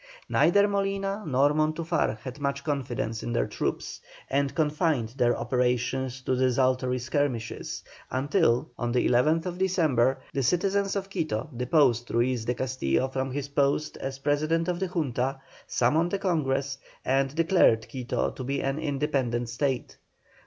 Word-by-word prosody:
Neither 200 +4 +4
Molina 195 0 -1
nor 140 +1 +3
Montufar 155 -4 0
had 130 +1 -7
much 140 0 -2
confidence 120 -6 -2
in 120 - -3
their - - +2
troops, - - -3 0.3
and 140 0 +1
confined 150 -6 +1
their 120 0 +1
operations 125 +1 0
to 130 - +1
desultory 130 0 +2
skirmishes, 130 -2 -2 0.3
until, 130 -2 +1
on 120 -1 -1
the 125 - +2
11th 160 +8 +2
December, 155 -10 +2 0.2
the 140 - 0
citizens 195 +8 +1
of 195 -1 -2
Quito 155 - -2
deposed 125 -2 +2
Ruiz 120 0 +1
de 125 - 0
Castillo 130 - 0
from 130 0 -2
his 140 +1 -4
post 140 +2 +1
as 135 0 -5
President 155 +4 +1
of 175 -1 -1
the 190 - 0
Junta, 135 - -1 0.3
summoned 160 +10 +2
a - - 0
Congress, 140 -8 -1 0.3
and 135 +1 +1
declared 165 -9 +4
Quito 130 -1 -2
to 130 - -7
be 140 +2 -1
an 135 +2 -1
independent 135 -5 -1
State. 130 +1 -2
135 Hz, 145 wpm, -27 LUFS, 125-160 Hz, 0.3 s, Neither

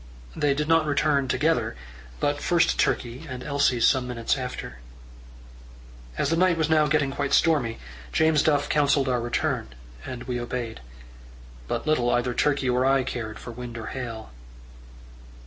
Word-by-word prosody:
They 145 -1 +1
did 150 +1 -1
not 165 -1 +3
return 145 -2 +2
together, 130 - +1 0.4
but 145 0 0
first 175 -2 +2
Turkey, 125 +7 -1
and 125 -1 -6
Elsie 140 -4 +1
some 125 +2 +3
minutes 115 -2 -1
after. 125 - -6 1.4
As - - 0
the - - +3
night 180 0 +3
was 160 -1 0
now 155 -1 +4
getting 145 -2 +1
quite 140 0 -2
stormy, 145 -9 +2 0.3
James 160 - +3
Duff 145 -2 +2
counselled 145 -2 +2
our 125 -2 +1
return, 120 - -1 0.4
and 120 -1 -6
we 125 -1 -3
obeyed. 120 -2 -4 0.9
But 115 - -3
little 155 -6 +2
either 120 0 +1
Turkey 140 0 +1
or 125 0 +2
I 135 0 +3
cared 110 -4 -5
for 120 - -9
wind 120 0 -8
or 110 - -6
hail. 115 - -6
130 Hz, 155 wpm, -25 LUFS, 120-150 Hz, 1.4 s, now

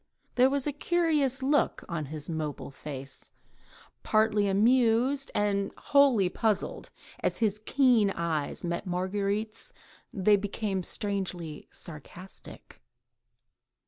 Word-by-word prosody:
There 255 +1 +5
was 280 -1 0
a 295 - 0
curious 295 -4 +1
look 290 +2 +1
on 165 -3 -3
his 150 +1 -5
mobile 155 -4 -4
face, 135 -1 -7 0.7
partly 215 -1 +2
amused 240 +6 +3
and 200 -1 +1
wholly 275 -9 +4
puzzled, 210 +3 -1 0.3
and - - 0
as - - -9
his 215 -2 0
keen 250 -7 +4
eyes 165 -5 -2
met 170 +3 -3
Marguerite's 200 - -2 0.4
they 205 +1 +3
became 200 -1 -2
strangely 180 -5 -3
sarcastic. 175 +4 -11
205 Hz, 110 wpm, -28 LUFS, 180-250 Hz, 0.7 s, There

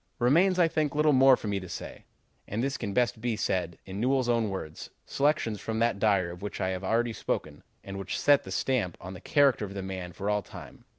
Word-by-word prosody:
"Remains, 170 - +3
I 175 -2 +5
think, 155 -3 -1
little 150 0 +4
more 130 0 +6
for - - -7
me 100 -1 -1
to 95 -2 -9
say, - - -8 0.4
and 110 +4 -2
this 135 0 -1
can 110 -5 -4
best 120 +1 0
be 120 -1 0
said 90 -4 -1
in 95 +1 -6
Newell's 130 0 +1
own 115 -3 +2
words, 85 -5 -6 0.2
selections 140 -7 0
from 110 0 -3
that 115 -2 +1
diary 100 -5 +2
of 90 - -10
which 105 - -5
I 95 - 0
have 95 0 -4
already 115 +4 +1
spoken, - - -4 0.2
and 100 0 -7
which 95 -2 -4
set 145 -1 +4
the - - -10
stamp 115 -10 -1
on 90 +1 -8
the 95 - -10
character 140 -6 +3
of 100 -1 -6
the 100 - -4
man 95 -2 -5
for 100 +4 -6
all 105 0 +1
time. - - -12
110 Hz, 235 wpm, -28 LUFS, 95-130 Hz, 0.4 s, more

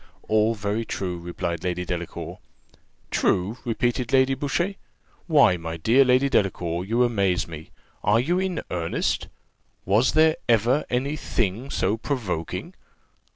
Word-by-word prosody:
"All 110 +1 +3
very 105 +2 -2
true," 90 -5 -4
replied 85 -1 -4
Lady 90 -1 -2
Delacour. 85 -1 -5 0.7
"True!" 100 +7 +1
repeated 120 +1 -1
Lady 135 0 +4
Boucher: 145 +8 -1 0.5
"why, 140 - +5
my 80 0 -5
dear 115 +11 +4
Lady 130 +1 +3
Delacour, 90 -8 0
you 115 +5 +2
amaze 100 -7 +1
me! 80 -1 -9 0.3
Are 105 +3 +4
you 170 +9 +1
in 185 -3 -2
earnest? 85 -2 -1 0.6
Was 105 +7 +3
there 160 0 +4
ever 120 +5 +3
any 135 +4 -1
thing 115 -2 -2
so 105 -3 0
provoking? 110 - -3
110 Hz, 130 wpm, -24 LUFS, 90-130 Hz, 0.7 s, why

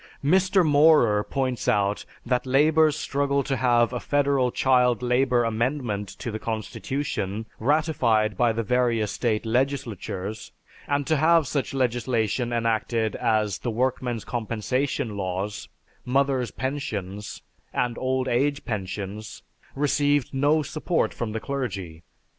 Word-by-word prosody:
Mr. 185 +3 +4
Maurer 145 -8 +5
points 130 -2 -2
out 100 0 +1 0.2
that 125 +1 0
labor's 155 +3 +4
struggle 140 -2 0
to 135 0 -1
have 120 -1 +2
a 125 - -2
Federal 140 -2 +1
Child 125 -2 +2
Labor 125 0 +2
amendment 115 -3 -1
to 120 - -5
the 110 - -4
Constitution 110 -1 -3
ratified 120 -6 +2
by 120 -1 +3
the 115 +1 -2
various 115 -2 +1
state 115 -2 -1
legislatures, 110 -5 -2 0.4
and 145 0 0
to 160 +1 +2
have 160 +1 +4
such 135 0 -2
legislation 120 -2 0
enacted 115 -1 0
as 105 -6 0
the 120 - -3
Workmen's 120 -1 -1
Compensation 120 0 -2
Laws, 95 +1 -4 0.3
Mothers' 135 -1 +1
Pensions, 105 -8 -5 0.3
and 120 -1 -1
Old 130 0 0
Age 140 +4 0
Pensions, 105 0 -5 0.3
received 145 -1 +1
no 145 +3 +2
support 160 +4 -1
from 115 -2 -4
the 110 - -3
clergy. 100 - -4
125 Hz, 125 wpm, -25 LUFS, 110-140 Hz, 0.4 s, Maurer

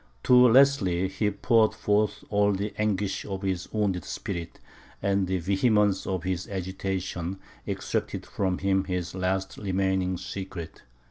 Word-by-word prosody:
To - - +3
Leslie 125 -7 +5
he 95 +2 0
poured 110 +2 +3
forth 105 -1 +1
all 105 0 +3
the 100 +2 -3
anguish 105 -2 0
of 95 -1 -5
his 95 -2 -2
wounded 100 -5 0
spirit, 85 -4 -5 0.4
and 100 -1 +1
the 95 0 0
vehemence 100 +2 +2
of 95 -3 -2
his 90 -1 -2
agitation 95 -1 -3 0.3
extracted - - -3
from 95 -2 -1
him 95 0 +1
his 90 -2 -3
last 95 +1 -2
remaining 95 -2 0
secret. 90 -4 -7
95 Hz, 135 wpm, -27 LUFS, 95-105 Hz, 0.4 s, Leslie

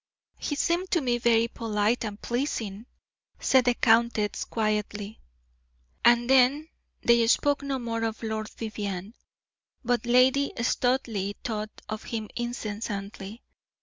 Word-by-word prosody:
"He 290 - -2
seemed 345 +5 0
to 340 - +2
me 240 -3 0
very 230 -1 +3
polite 225 0 0
and 210 -1 -6
pleasing," 235 -4 -3 0.5
said 260 -2 +4
the 245 -1 +3
countess, 225 -3 +2
quietly. 210 -1 -2 0.8
And 240 0 +5
then 270 +4 +4 0.3
they 235 -1 +4
spoke 285 +4 +3
no 275 -1 -2
more 230 -2 -3
of 225 +1 -4
Lord 220 -1 -3
Vivianne, 205 -3 -5 0.7
but 240 -1 0
Lady 255 +3 +4
Studleigh 235 -4 0
thought 215 -2 -4
of 215 0 -6
him 220 -2 -4
incessantly. 210 -3 -5
230 Hz, 120 wpm, -27 LUFS, 215-250 Hz, 0.8 s, And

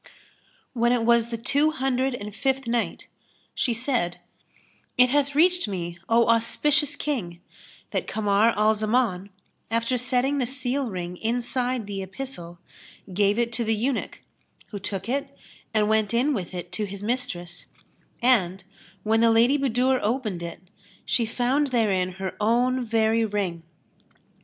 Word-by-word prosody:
When 240 -1 +2
it 240 -2 +1
was 235 0 +4
the 230 - -3
Two 285 +6 +2
Hundred 265 -3 0
and 210 -3 -7
Fifth 270 +1 0
Night, 235 0 -1 0.5
She 245 - 0
said, 230 -8 -1 0.8
It 250 0 +6
hath 285 +1 +1
reached 355 +1 +4
me, 175 -3 -4
O 230 +1 +4
auspicious 290 +6 +2
King, 210 - -3 0.5
that - - -2
Kamar 210 +1 +3
al 215 +1 +4
Zaman, 215 -3 0 0.4
after 230 +3 0
setting 255 +3 +1
the 250 - 0
seal 260 0 -1
ring 180 -2 -5
inside 245 +1 -1
the 200 -1 -4
epistle, 190 -4 -7 0.6
gave 205 +2 +2
it 235 0 0
to 235 - -1
the 225 0 +1
eunuch 245 +4 -2 0.5
who 205 - -6
took 195 0 -4
it 275 +2 -3 0.3
and 215 -2 +2
went 220 0 +1
in 270 +5 +2
with 185 -6 -4
it 175 0 -6
to 210 +4 -1
his 200 +1 -8
mistress; 180 -7 -4 0.6
and, 190 -7 +3 0.4
when 225 +1 +2
the 230 - +5
Lady 230 +4 +5
Budur 260 0 +2
opened 215 -6 -1
it, 170 0 -7 0.4
she 230 -2 +1
found 255 +5 +1
therein 200 -8 +1
her 190 0 -5
own 245 +4 +2
very 225 0 +2
ring. 200 -6 -2
230 Hz, 145 wpm, -25 LUFS, 200-255 Hz, 0.8 s, It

